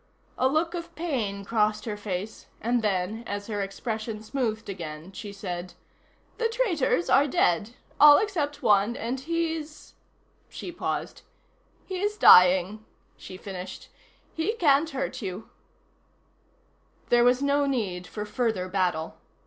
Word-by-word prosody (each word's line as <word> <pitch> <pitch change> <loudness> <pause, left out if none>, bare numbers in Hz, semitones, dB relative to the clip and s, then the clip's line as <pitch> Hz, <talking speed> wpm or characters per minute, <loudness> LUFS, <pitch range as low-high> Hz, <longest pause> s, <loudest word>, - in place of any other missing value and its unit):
A 260 - +2
look 315 +5 0
of 340 -1 -7
pain 225 -12 -3
crossed 215 0 +1
her 215 -3 -3
face, 205 0 -5
and 240 +1 0
then, 205 +2 -1
as 205 0 -4
her 205 -2 -3
expression 215 +2 -4
smoothed 220 -2 -2
again, 165 -3 -7
she 200 +1 -8
said: 180 -3 -6 0.6
"The 460 -1 +1
traitors 350 - +1
are 285 +2 +4
dead. 205 - +1 0.2
All 295 0 +9
except 320 -9 -2
one, 210 +2 +3
and 245 +3 -3
he's 320 0 -4 0.3
" - - -39
She 355 - -5
paused. 345 - -4 0.6
"He's 405 +3 -2
dying," 185 - +6 0.3
she 185 - -10
finished. 190 -1 -8 0.4
"He 325 +7 -1
can't 315 -7 +3
hurt 270 -2 -4
you." 195 +1 -6 1.6
There 240 0 +5
was 250 +2 +3
no 280 0 +2
need 195 -9 -2
for 210 -1 -5
further 220 -5 -1
battle. 180 -4 -1
220 Hz, 135 wpm, -26 LUFS, 195-290 Hz, 1.6 s, All